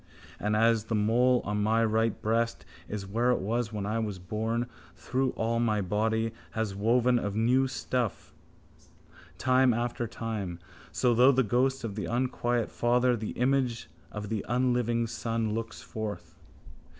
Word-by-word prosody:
And 105 +1 0
as 115 0 +3
the 115 - -1
mole 120 +4 +3
on 105 0 -1
my 110 +2 +3
right 110 0 +1
breast 115 +2 0 0.2
is 105 -2 -4
where 115 +5 0
it 125 - +3
was 115 +3 -1
when 105 -2 -3
I 110 +2 -1
was 105 -4 -3
born, 110 +6 -2 0.5
though 130 0 +3
all 115 +1 0
my 110 -3 +1
body 110 +4 0 0.2
has 110 -3 -2
been 100 - -8
woven 120 +2 +3
of 100 -2 -3
new 125 +4 +3
stuff 125 -3 -3 1.0
time 130 -2 +3
after 120 0 -2
time, 105 -6 -4 0.3
so 120 +7 +2
through 125 +4 +6
the 130 0 +3
ghost 130 +4 +1
of 110 -3 -3
the 105 0 -4
unquiet 120 -1 -1
father 125 +1 +2
the 110 -2 -4
image 125 -2 0 0.2
of 105 -1 -6
the 110 -3 -2
unliving 120 -1 +1
son 115 -1 -2
looks 115 0 -5
forth. 110 -2 -6
115 Hz, 160 wpm, -29 LUFS, 105-120 Hz, 1.0 s, through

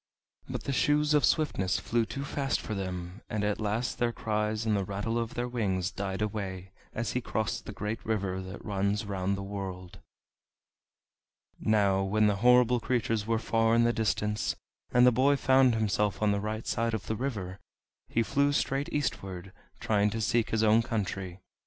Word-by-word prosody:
But - - -4
the 140 - -2
Shoes 150 +2 +2
of 150 - +4
Swiftness 95 - +2
flew 115 +2 0
too 140 +1 -5
fast 135 -2 -1
for 110 - -5
them, 90 0 -5
and 105 -1 -2
at 105 +1 -1
last 110 +4 -1
their 120 -1 +2
cries 110 0 -1
and 110 -1 +2
the 100 - 0
rattle 100 +5 -2
of 115 0 -4
their 120 0 -1
wings 95 -7 -1
died 95 +1 -3
away 95 -3 -4 0.2
as 115 0 -3
he 125 - -1
crossed 110 -1 -2
the - - -4
great 105 +2 -4
river 100 -4 -1
that 95 +1 -9
runs 100 0 0
round 100 -1 -1
the 100 - -5
world. 95 -2 -6 1.6
Now 100 -3 +2
when 105 +3 +2
the 105 -1 +2
horrible 125 +2 +5
creatures 115 -3 -1
were 115 0 +2
far 115 0 +2
in 115 - +4
the 120 0 +3
distance, 105 -1 0 0.4
and 125 0 +6
the 125 - +7
boy 135 +4 +4
found 130 -3 +4
himself 105 -1 0
on 105 - +4
the 100 0 0
right 110 +1 -4
side 115 0 0
of 110 - -5
the 110 - -2
river, 100 -7 -4 0.5
he 115 - +1
flew 140 +5 +2
straight 140 0 0
eastward, 95 -9 -3 0.3
trying 105 -1 +2
to 115 - -3
seek 115 +2 +1
his 110 0 +1
own 110 +1 +5
country. 95 -5 -3
110 Hz, 185 wpm, -29 LUFS, 100-120 Hz, 1.6 s, the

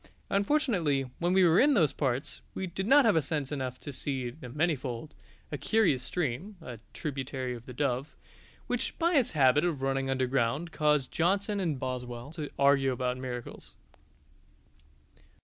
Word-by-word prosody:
Unfortunately, 200 - +2 0.2
when 175 +1 +1
we 190 0 +5
were 170 +1 +5
in 285 +1 +5
those 155 - +3
parts 135 -1 -2
we 190 - -2
did 190 +2 -4
not 275 +2 +7
have 165 -9 +4
sense 145 -1 -2
enough 130 -3 -3
to 145 - -7
see 130 -2 -2
the 125 -1 -10
Manyfold, 145 -2 -2 0.4
a 145 - -3
curious 180 - +2
stream 175 - -3
(a 125 -8 -9
tributary 135 -3 -4
of 120 0 -10
the 125 - -7
Dove) 135 +2 -1 0.5
which - - -2
by 340 +1 +2
its 270 -7 +3
habit 140 -1 +4
of 160 -6 -1
running 135 0 0
underground 130 +4 0
caused 150 -3 +1
Johnson 200 +4 +1
and 160 -8 -1
Boswell 125 0 -5
to 155 -3 -5
argue 140 -1 +4
about 125 0 -1
miracles. 125 -2 -7
145 Hz, 155 wpm, -30 LUFS, 130-175 Hz, 0.5 s, not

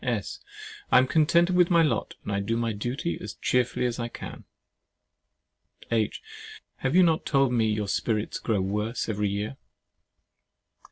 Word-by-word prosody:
S. 115 -5 -2 0.5
I - - +7
am 130 - +6
contented 170 +5 +3
with 180 -1 +4
my 170 -2 +5
lot, 125 -9 -1
and 100 -1 -1
do 115 +3 -1
my 115 -1 -1
duty 120 +10 -3
as - - -7
cheerfully 125 0 0
as 120 0 -2
I 120 - -2
can. - - -9 1.5
H. 110 -2 0 0.5
Have 135 +4 -1
you 185 - +7
not 165 -2 +2
told 135 -3 +2
me 115 -2 +2
your 105 -1 -1
spirits 105 +2 -1
grow 105 -4 0
worse 105 +5 -2
every 105 -2 -1
year? 105 +6 -3
120 Hz, 155 wpm, -26 LUFS, 105-135 Hz, 1.5 s, I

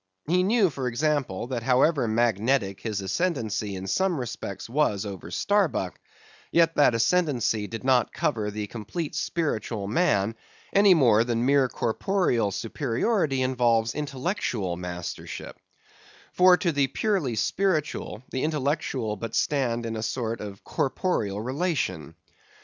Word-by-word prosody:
He 180 +3 +3
knew, 200 -1 +3
for 135 -2 -3
example, 130 -5 -1
that 120 -1 -3
however 130 +2 +3
magnetic 110 -1 +1
his 105 -3 -3
ascendency 110 - -1
in 95 0 -6
some 180 - +1
respects 120 -5 -5
was 115 -6 +1
over 95 -4 -7
Starbuck, 170 - 0 0.5
yet 165 -1 +4
that 145 -5 +4
ascendency 120 -6 +1
did 115 +3 -7
not 130 -2 +3
cover 105 -2 -1
the 105 0 -4
complete 120 - -5
spiritual 115 - -2
man 110 - +2 0.4
any 200 -2 +6
more 115 -8 +5
than 120 0 -1
mere 135 -1 +4
corporeal 120 - 0
superiority 135 - 0
involves 120 -3 +2
intellectual 130 - -2
mastership; 90 0 -6 0.8
for 180 0 +6
to 175 -3 0
the 140 -3 +2
purely 180 - 0
spiritual, 155 - -1
the 130 - -2
intellectual 140 -7 -1
but 115 +2 -5
stand 120 -5 0
in 115 0 -3
a 110 - -3
sort 115 0 -2
of 100 -2 -8
corporeal 120 - -1
relation. 130 - -2
125 Hz, 130 wpm, -26 LUFS, 110-155 Hz, 0.8 s, any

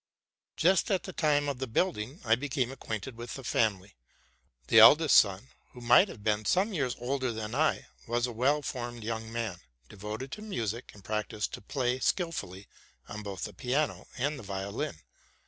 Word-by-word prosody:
Just 185 +2 +3
at 190 -3 +1
the 190 - -7
time 145 -3 +2
of 140 -3 -3
the 130 - -3
building 130 - -1
I 110 - +4
be 135 +5 -1
came 130 -2 0
acquainted 115 -2 -6
with 120 +1 -6
the 135 - -8
family. 105 -5 0 0.7
The 115 - +7
eldest 145 +7 +8
son, 100 +5 +4 0.2
who 125 - -11
might 120 - +6
have 105 - -11
been 105 0 +1
some 195 - +2
years 135 -8 -1
older 130 +1 -1
than 110 0 -5
I, 155 +4 +1 0.2
was 120 +1 +1
a 125 - -4
well 135 +6 +1
formed 120 -4 -5
young 110 0 -4
man, 115 -6 -3 0.3
devoted 105 +6 -6
to 210 - -7
music, 120 - -4
and 100 - -15
practised 105 +1 -3
to - - -6
play 125 +3 -1
skilfully 125 - -2 0.4
on 105 - -6
both 100 -2 -6
the - - -5
piano 140 +4 -1
and 145 +3 -1
the - - -10
violin. 100 - -4
120 Hz, 180 wpm, -30 LUFS, 110-145 Hz, 0.7 s, eldest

